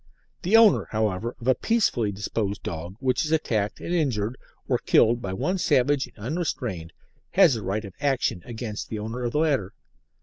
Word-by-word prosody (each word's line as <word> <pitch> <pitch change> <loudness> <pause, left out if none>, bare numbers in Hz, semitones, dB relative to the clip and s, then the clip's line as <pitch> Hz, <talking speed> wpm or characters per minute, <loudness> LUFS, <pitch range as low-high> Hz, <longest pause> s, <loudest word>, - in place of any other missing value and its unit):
The 200 +5 +4
owner, 225 -3 +5
however, 110 +1 -1
of 115 - -8
a 130 - +6
peaceably 135 - +1
disposed 100 0 -3
dog 85 +3 -5
which 130 -1 +1
is 155 - -3
attacked 110 -10 0
and 175 - -4
injured, 125 -9 0 0.3
or - - +1
killed, 115 +1 +3
by 95 - -4
one 180 - -1
savage 145 -4 +2
and - - -23
unrestrained, 115 - -3 0.4
has 180 -9 +6
a 110 - -4
right 100 +3 -2
of 100 - -9
action 130 -9 0
against 115 -3 -6
the 110 - -4
owner 110 +4 -5
of 120 - -1
the - - 0
latter. 145 - +1
120 Hz, 180 wpm, -25 LUFS, 105-145 Hz, 0.4 s, a